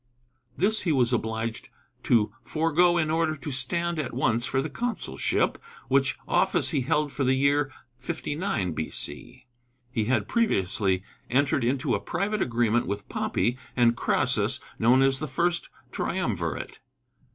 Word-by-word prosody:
This 215 +4 +3
he 170 - 0
was 125 -4 +2
obliged 110 0 -2 0.4
to 110 -4 +3
forego 165 +2 +2
in 155 -2 +1
order 160 -1 +1
to 145 0 -6
stand 170 +6 0
at 130 -5 -3
once 120 -2 +1
for 130 - 0
the 140 - -1
consulship, 240 - -1 0.3
which - - +2
office - - +2
he 145 -5 0
held 145 +3 0
for 140 - -2
the 130 0 +3
year 140 +1 +2 0.3
59 145 - -2
B.C. 80 +9 -4 0.5
He 110 -4 0
had 130 +4 +1
previously 95 - +1 0.3
entered 135 +1 +2
into 130 +3 0
a - - +1
private 210 +1 -2
agreement 120 -1 +1
with 100 0 -4
Pompey 125 +2 -1 0.2
and 120 -1 +4
Crassus, - - +1 0.2
known 125 +4 +5
as 135 0 +3
the 155 - -3
First 170 +5 0 0.2
Triumvirate. 105 - -3
135 Hz, 140 wpm, -26 LUFS, 115-160 Hz, 0.5 s, known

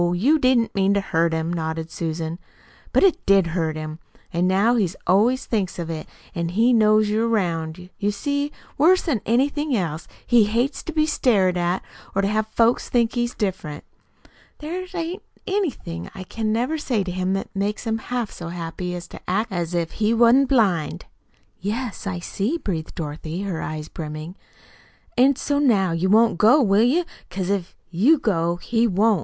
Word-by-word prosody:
You 275 - +3
didn't 255 -4 +2
mean 195 0 +2
to - - +3
hurt 170 -4 +1
him," 160 +1 -1
nodded 160 -1 -3
Susan. 165 0 -4 0.5
"But - - +3
it 385 -4 +3
did 195 -4 +4
hurt 160 -3 -1
him. 155 0 -6 0.3
An' 175 +2 +2
now 200 +6 +3
he 210 -7 +2 0.2
always 235 +8 +3
thinks 200 -6 -1
of 170 -2 -4
it, 155 -1 -5 0.3
if 170 0 -2
he 225 +7 +3
knows 215 -1 +4
you're 220 +2 +1
'round. 180 -4 -2
You 205 -1 +1
see, 285 +6 -2 0.3
worse'n 320 - +3
anything 280 +4 +1
else, 165 -4 -3 0.2
he 235 -3 +5
hates 235 +7 0
to - - -4
be 310 -1 +2
stared 210 - +2
at 175 +1 0 0.3
or 195 - +2
to - - +2
have 215 +1 0
folks 230 +2 +2
think 235 -1 +2
he's 240 0 -1
different. 185 -7 -3 0.7
There 355 +5 -5
ain't 345 +3 -3 0.2
anything 295 - -3
I 190 - -6
can 220 +3 -2
ever 275 +7 -1
say 240 -8 0
to 185 - -4
him 185 +1 -1
that 195 +1 -4
makes 205 +4 -2
him 225 0 -1
half 245 -2 -3
so 170 - -8
happy 175 +1 -5
as 175 0 -7
to - - -10
act 210 +4 0
as 175 -1 -2
if 170 -1 -1
he 220 +1 +1
wa'n't 240 +3 +5
blind." 190 - +1 0.5
"Yes, 215 +2 -4
I 185 -2 -2
see," 205 - -2
breathed 170 - -4
Dorothy, 160 +3 -5
her 185 -5 -3
eyes 155 -1 -5
brimming. 155 +2 -7 0.8
"An' 265 +3 +5
so 285 +2 -1
now 205 -10 +3
you 170 +3 0
won't 225 -2 +4
go, 230 +8 +6
will 205 -5 +4
you? 290 +10 +3 0.2
Because 190 0 -2
if 195 -3 -2 0.2
you 230 - +4
go, 170 - 0
he 230 +6 +1
won't." 210 +3 +3
200 Hz, 180 wpm, -23 LUFS, 175-240 Hz, 0.8 s, go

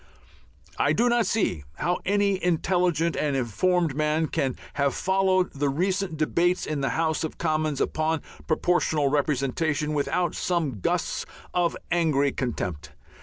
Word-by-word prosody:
I - - +3
do 245 +1 +3
not 240 -1 +2
see 90 - 0
how 175 +3 -1
any 200 -1 +1
intelligent 175 -1 +1
and 145 -2 0
informed 160 - +1
man 155 +1 +1
can 130 -2 -1 0.2
have 140 -1 0
followed 190 -1 +2
the 140 0 0
recent 185 +3 -1
debates 175 +4 +1
in 150 -2 -2
the 135 - +1
House 160 -1 0
of 160 - -4
Commons 155 -3 0
upon 155 0 0 0.2
Proportional 155 -3 +2
Representation 150 +2 0
without 170 +4 0
some 160 - -1
gusts - - -1 0.3
of 175 -2 +1
angry 155 -5 +2
contempt. 85 - -4
160 Hz, 135 wpm, -26 LUFS, 140-180 Hz, 0.3 s, I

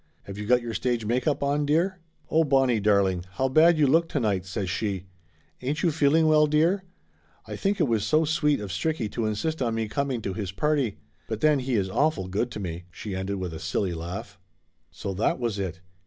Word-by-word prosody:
"Have 100 - -8
you 105 - -5
got 125 0 +4
your 115 -1 -4
stage 120 -1 -1
make 120 +5 0
up 145 -2 +1
on, 145 +1 +1
dear?" 170 +6 +1 0.3
"Oh, 160 +1 +3
Bonnie 135 -5 +3
darling, 100 -3 +2
how 130 +5 0
bad 160 +5 +5
you 150 - +4
look 165 +5 +3
to 145 - -1
night!" 100 -6 0
says 95 +1 -3
she. 95 0 -2 0.6
"Ain't 145 +5 -2
you 170 - +3
feeling 155 +1 +3
well, 155 -1 +5
dear? 165 +6 +2 0.6
I - - -6
think 195 +1 -1
it - - +4
was 115 -4 +1
so 155 +5 +3
sweet 150 -2 +1
of 100 -3 -5
Stricky 110 - -2
to 115 -2 -1
insist 155 +9 -2
on 115 -3 0
me 110 -1 -1
coming 135 +1 -1
to 95 - -2
his 95 -1 -4
party. 140 -1 0 0.3
But 110 0 -4
then 150 -2 +4
he 130 -1 -1
is 100 -3 +1
awful 145 -1 0
good 105 +6 -1
to 110 - -7
me!" 85 -2 -5
she 95 +3 -6
ended 95 +1 -2
with 90 -3 -4
a 80 - -6
silly 90 +2 -1
laugh. 90 +4 -6 0.5
So 100 - -5
that 100 +4 +1
was 115 -5 -2
it! 90 -2 -4
120 Hz, 220 wpm, -26 LUFS, 100-150 Hz, 0.6 s, bad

